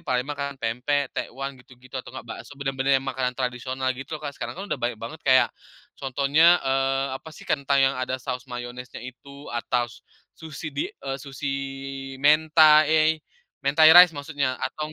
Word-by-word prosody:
Palembang 130 -2 -1
makan 140 -1 -4
pempek, 130 +4 -1
tekwan, 135 0 -5
gitu-gitu 130 +1 -9
atau - - -15
nggak 130 - -9
bakso, 140 - -9
benar-benar 135 0 +1
yang 135 - -3
makanan 130 -2 -2
tradisional 130 +1 -2
gitu 135 +4 -7
loh 150 - -12
Kak, 140 - -4
sekarang 120 -1 -6
kan 195 - -6
udah 135 - -3
banyak 120 -1 -1
banget 115 +9 -8
kayak, 130 -1 +4 0.5
contohnya, 140 +6 +4
eee, 135 0 +1
apa 160 - -12
sih, - - -12
ketang 140 -1 +2
yang 135 +1 +2
ada 130 0 -2
saus 130 0 -6
mayonesnya 120 0 -7
itu 140 +3 -11
atau 120 0 0 0.6
sushi 155 -1 -7
di, 140 - -1
eee, 135 0 -6
sushi 135 +1 -9
di 135 0 -6
mentai 155 +1 +5 0.4
mentai 150 +3 +6
rice 180 -2 +10
maksudnya 140 -3 -3
atau 155 0 -4
135 Hz, 170 wpm, -25 LUFS, 130-145 Hz, 0.6 s, rice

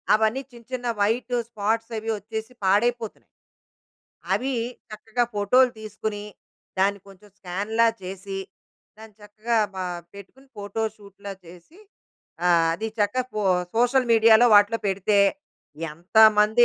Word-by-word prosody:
అవన్నీ 220 +4 +1
చిన్న 235 -1 -14
చిన్న 245 -1 -3
వైటు 235 +4 0
స్పాట్సవి 225 +1 -2
వచ్చేసి 220 +3 -7
పాడైపోతున్నాయి. 225 +3 +1 1.1
అవి 265 +2 -1 0.4
చక్కగా 225 +3 -2
ఫోటోలు 245 +6 +4
తీసుకొని, 210 -1 -5 0.5
దాన్ని 200 +1 +2
కొంచెం 195 +1 -17
స్కాన్‌లా 205 +6 0 0.2
చేసి, 195 +1 -6 0.6
దాన్ని 220 -1 -13
చక్కగా 215 +3 -3 0.2
ప - - -11 0.4
పెట్టుకుని 225 +8 -14
ఫోటోషూట్‌లా 205 -1 -6
చేసి, 175 - -16 0.7
ఆహ్, 170 -2 +4
అది 220 +6 -4
చక్కా 210 +5 +1
పో 215 - -1 0.3
సోషల్ 245 +2 +3
మీడియాలో 225 +1 +6
వాటిల్లో 205 +2 +5
పెడితే, 200 +2 +1 0.7
ఎంతమంది 215 +6 +5
215 Hz, 110 wpm, -24 LUFS, 200-230 Hz, 1.1 s, మీడియాలో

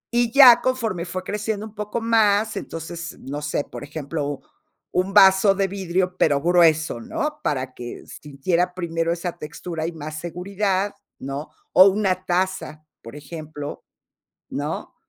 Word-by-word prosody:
Y 240 -1 +3
ya, 255 -2 +9
conforme 225 -9 -1
fue 185 +1 -5
creciendo 210 +1 -3
un 220 - -11
poco 210 +2 -4
más, 220 -2 +2
entonces, 170 +1 -6
no 145 +2 -6
sé, 150 -1 -1
por - - -9
ejemplo, 145 -1 -4 0.5
un 185 +2 0
vaso 195 0 +6
de 195 0 +1
vidrio, 185 -1 -1
pero 145 -5 +3
grueso, 160 -5 +3
¿no? 300 - -3
Para 130 -3 -2
que 120 -1 -8
sintiera 170 +5 -2
primero 165 -2 -1
esa 175 0 -4
textura 160 +1 -5
y - - -3
más 155 -1 -7
seguridad, 190 +3 -1 0.2
¿no? 140 +3 -6 0.2
O 185 - +8
una 190 -2 +1
taza, 180 -4 -1 0.2
por 115 +4 -11
ejemplo, 150 0 -8 0.7
¿no? 145 +3 -4
175 Hz, 145 wpm, -23 LUFS, 155-200 Hz, 0.7 s, ya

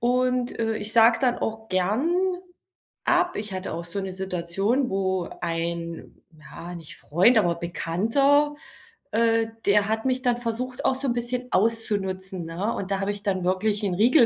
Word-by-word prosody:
Und, 250 +1 +1
äh, 225 -1 0
ich 215 +1 -3
sage 225 0 +6
dann 250 -2 +2
auch 220 0 -4
gern 210 - +1 0.9
ab. 355 0 +2
Ich 210 -1 -4
hatte 185 0 -4
auch 170 - -5
so 170 +4 -3
'ne 190 -1 -4
Situation, 190 +7 -1
wo 190 -2 0
ein 170 0 -4 0.2
ja, 155 +4 -9
nicht 165 -3 -8
Freund, 190 +10 +4
aber 175 -5 +2
Bekannter, 230 - +2 0.6
äh, 225 0 +2 0.2
der 205 0 +4
hat 220 0 0
mich 255 0 +1
dann 245 -1 +3
versucht, 245 +2 -4
auch - - +4
so 270 +1 -2
'n 240 - +2
bisschen 245 +1 -2
auszunutzen, 190 -4 0
ne? 180 +7 -2
Und 200 0 -5
da 195 - +1
habe 200 +1 0
ich 205 0 -8
dann 190 -3 -1
wirklich 205 +3 +1
'n 195 -3 0
Riegel 240 - +6
210 Hz, 175 wpm, -25 LUFS, 185-240 Hz, 0.9 s, sage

